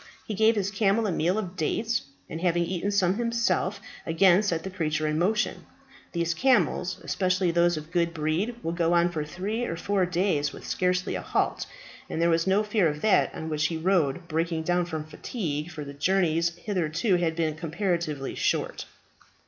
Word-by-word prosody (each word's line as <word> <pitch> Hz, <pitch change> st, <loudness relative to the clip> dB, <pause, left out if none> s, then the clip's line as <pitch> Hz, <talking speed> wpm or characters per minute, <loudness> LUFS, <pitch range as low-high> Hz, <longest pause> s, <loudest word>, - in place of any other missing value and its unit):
He 215 Hz, -, -4 dB
gave 220 Hz, +2 st, +4 dB
his 200 Hz, -1 st, -1 dB
camel 210 Hz, +2 st, +2 dB
a 205 Hz, -, 0 dB
meal 175 Hz, +4 st, +1 dB
of 190 Hz, -4 st, -4 dB
dates, 225 Hz, +8 st, 0 dB, 0.3 s
and 160 Hz, -, -6 dB
having 175 Hz, -1 st, +2 dB
eaten 185 Hz, +3 st, -2 dB
some 195 Hz, -2 st, +2 dB
himself, 230 Hz, -4 st, 0 dB, 0.2 s
again 175 Hz, +3 st, +4 dB
set 170 Hz, -6 st, -1 dB
the 190 Hz, -, -5 dB
creature 155 Hz, -3 st, -1 dB
in 155 Hz, 0 st, 0 dB
motion. 210 Hz, +5 st, 0 dB, 0.4 s
These 170 Hz, -1 st, 0 dB
camels, 240 Hz, -7 st, +2 dB
especially 185 Hz, -1 st, +1 dB
those 175 Hz, 0 st, +3 dB
of 155 Hz, +1 st, -8 dB
good 170 Hz, -1 st, +1 dB
breed, 165 Hz, +8 st, -1 dB
will 165 Hz, -, -1 dB
go 170 Hz, 0 st, +1 dB
on 175 Hz, 0 st, +3 dB
for 155 Hz, -3 st, -2 dB
three 195 Hz, +10 st, -3 dB
or 165 Hz, -, -4 dB
four 195 Hz, 0 st, 0 dB
days 175 Hz, -5 st, +1 dB
with -, -, -11 dB
scarcely 180 Hz, 0 st, 0 dB
a -, -, -3 dB
halt; -, -, -1 dB, 0.4 s
and -, -, -3 dB
there 170 Hz, 0 st, +3 dB
was 165 Hz, +2 st, +1 dB
no 195 Hz, +3 st, +3 dB
fear 210 Hz, -4 st, +2 dB
of 150 Hz, -1 st, -3 dB
that 215 Hz, -, +3 dB
on 160 Hz, -, -5 dB
which 150 Hz, -1 st, +1 dB
he 165 Hz, -, -3 dB
rode 170 Hz, -2 st, +1 dB
breaking 165 Hz, 0 st, -1 dB
down 175 Hz, +1 st, +1 dB
from 160 Hz, -3 st, -4 dB
fatigue, 155 Hz, -, -4 dB
for 155 Hz, -3 st, -7 dB
the 140 Hz, -, -8 dB
journeys 170 Hz, +1 st, +1 dB
hitherto 180 Hz, 0 st, 0 dB
had 165 Hz, -2 st, 0 dB
been 160 Hz, -2 st, 0 dB
comparatively 165 Hz, -3 st, -2 dB
short. -, -, -1 dB
175 Hz, 190 wpm, -27 LUFS, 160-195 Hz, 0.4 s, gave